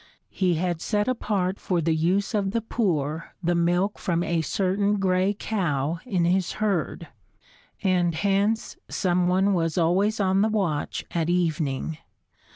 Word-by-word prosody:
He 180 Hz, -3 st, +1 dB
had 170 Hz, 0 st, -1 dB
set 210 Hz, +2 st, 0 dB
apart 200 Hz, -6 st, -1 dB
for 180 Hz, -2 st, 0 dB
the 165 Hz, 0 st, +1 dB
use 185 Hz, +8 st, +1 dB
of 200 Hz, -2 st, +1 dB
the 230 Hz, -, +1 dB
poor 165 Hz, -, -2 dB
the 175 Hz, +1 st, +2 dB
milk 175 Hz, +4 st, +1 dB
from 170 Hz, -1 st, 0 dB
a 170 Hz, -2 st, 0 dB
certain 200 Hz, +5 st, 0 dB
gray 190 Hz, +1 st, +1 dB
cow 165 Hz, -8 st, -1 dB
in 185 Hz, -7 st, +1 dB
his 180 Hz, +1 st, +1 dB
herd, 185 Hz, -6 st, -2 dB, 0.7 s
and 175 Hz, -3 st, +2 dB
hence 200 Hz, +4 st, 0 dB
some 180 Hz, -1 st, +1 dB
one 190 Hz, +2 st, +3 dB
was 165 Hz, -1 st, 0 dB
always 190 Hz, +6 st, +2 dB
on 190 Hz, -1 st, +2 dB
the 215 Hz, -, +3 dB
watch 185 Hz, -9 st, -1 dB
at 165 Hz, -1 st, -1 dB
evening. 160 Hz, -3 st, -1 dB
180 Hz, 150 wpm, -25 LUFS, 170-200 Hz, 0.7 s, one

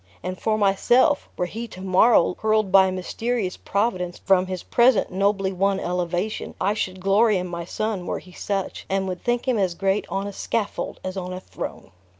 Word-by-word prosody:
And 185 Hz, +1 st, -5 dB
for 215 Hz, -1 st, +1 dB
myself, 215 Hz, +8 st, +3 dB
were 180 Hz, -, 0 dB
he 225 Hz, +6 st, -6 dB
to 195 Hz, -, -12 dB
morrow 190 Hz, 0 st, +4 dB
hurled 215 Hz, -2 st, +1 dB
by 190 Hz, -1 st, +7 dB
a -, -, -1 dB
mysterious 190 Hz, +2 st, -2 dB
Providence 185 Hz, -4 st, -1 dB
from 190 Hz, -1 st, +2 dB
his 185 Hz, -2 st, -5 dB
present 240 Hz, -1 st, +3 dB
nobly 195 Hz, 0 st, +1 dB
won 195 Hz, +1 st, +1 dB
elevation, 180 Hz, +3 st, -2 dB
I 200 Hz, +2 st, +1 dB
should 185 Hz, -3 st, -3 dB
glory 200 Hz, +3 st, +3 dB
in 180 Hz, -, -2 dB
my 170 Hz, -1 st, -5 dB
son 205 Hz, -1 st, -3 dB
were -, -, -1 dB
he 180 Hz, -, -12 dB
such, 195 Hz, +1 st, -4 dB
and 195 Hz, 0 st, 0 dB
would 180 Hz, -2 st, -5 dB
think 240 Hz, +1 st, 0 dB
him 245 Hz, -4 st, +2 dB
as 185 Hz, -3 st, 0 dB
great 195 Hz, +2 st, 0 dB
on 195 Hz, +1 st, -2 dB
a 200 Hz, -, -5 dB
scaffold 215 Hz, +1 st, -3 dB
as 185 Hz, +1 st, -4 dB
on 185 Hz, -1 st, -4 dB
a 185 Hz, -, -5 dB
throne." 185 Hz, -, -8 dB
195 Hz, 195 wpm, -23 LUFS, 185-215 Hz, -, by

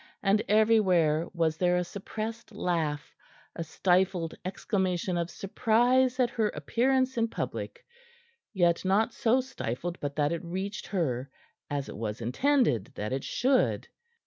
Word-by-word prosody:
And 205 Hz, +1 st, +3 dB
everywhere 185 Hz, -8 st, +3 dB
was 165 Hz, -2 st, 0 dB
there 180 Hz, 0 st, +2 dB
a 180 Hz, -, +1 dB
suppressed 220 Hz, +5 st, -6 dB
laugh, 165 Hz, -7 st, -2 dB, 0.4 s
a 165 Hz, -, -3 dB
stifled 180 Hz, 0 st, +1 dB
exclamation 185 Hz, -1 st, -1 dB
of 170 Hz, 0 st, -1 dB
surprise 245 Hz, +7 st, +2 dB
at 245 Hz, -2 st, +3 dB
her 220 Hz, -2 st, +1 dB
appearance 255 Hz, -, 0 dB
in 230 Hz, -, +2 dB
public -, -, -5 dB, 0.7 s
yet 175 Hz, -4 st, +2 dB
not 210 Hz, +5 st, +2 dB
so 245 Hz, +3 st, +2 dB
stifled 175 Hz, -, -5 dB
but 145 Hz, -1 st, -4 dB
that 145 Hz, -1 st, +1 dB
it 170 Hz, +1 st, -3 dB
reached 190 Hz, +3 st, -4 dB
her, 140 Hz, -9 st, -1 dB, 0.4 s
as 140 Hz, -1 st, -2 dB
it -, -, -8 dB
was 110 Hz, -1 st, -4 dB
intended 125 Hz, -, +2 dB
that 105 Hz, +4 st, -3 dB
it 135 Hz, -, -2 dB
should. 260 Hz, 0 st, +1 dB
185 Hz, 140 wpm, -29 LUFS, 160-225 Hz, 0.7 s, And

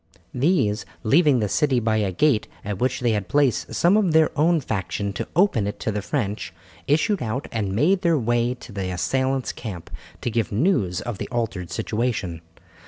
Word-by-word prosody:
These, 125 Hz, -, +1 dB, 0.2 s
leaving 140 Hz, 0 st, +4 dB
the 105 Hz, -, +1 dB
city 135 Hz, +3 st, +2 dB
by 110 Hz, -1 st, +1 dB
a 100 Hz, -3 st, 0 dB
gate 120 Hz, +3 st, +2 dB, 0.2 s
at 100 Hz, -2 st, -3 dB
which 130 Hz, +1 st, 0 dB
they 120 Hz, -2 st, +2 dB
had 105 Hz, -4 st, -1 dB
placed 140 Hz, +1 st, +1 dB
some 175 Hz, +4 st, +4 dB
of 200 Hz, -6 st, +2 dB
their 160 Hz, 0 st, +4 dB
own 165 Hz, +3 st, +3 dB
faction 100 Hz, -4 st, -3 dB
to -, -, -4 dB
open 165 Hz, -, +3 dB
it 105 Hz, -, -5 dB
to 110 Hz, -, -1 dB
the 105 Hz, 0 st, -2 dB
French, 100 Hz, -, -3 dB, 0.4 s
issued 160 Hz, +7 st, +2 dB
out 125 Hz, +4 st, -3 dB
and 100 Hz, -4 st, -2 dB
made 180 Hz, -, +3 dB
their 170 Hz, -3 st, +3 dB
way 120 Hz, 0 st, +1 dB
to 120 Hz, -, -12 dB
the 95 Hz, -2 st, -3 dB
assailants' 130 Hz, +10 st, 0 dB
camp, 95 Hz, -8 st, -8 dB, 0.3 s
to 120 Hz, -, -2 dB
give 115 Hz, -1 st, -1 dB
news 105 Hz, -, +1 dB
of 120 Hz, -5 st, -5 dB
the -, -, -4 dB
altered 100 Hz, -8 st, -3 dB
situation. 110 Hz, -7 st, -2 dB
120 Hz, 185 wpm, -23 LUFS, 105-145 Hz, 0.4 s, leaving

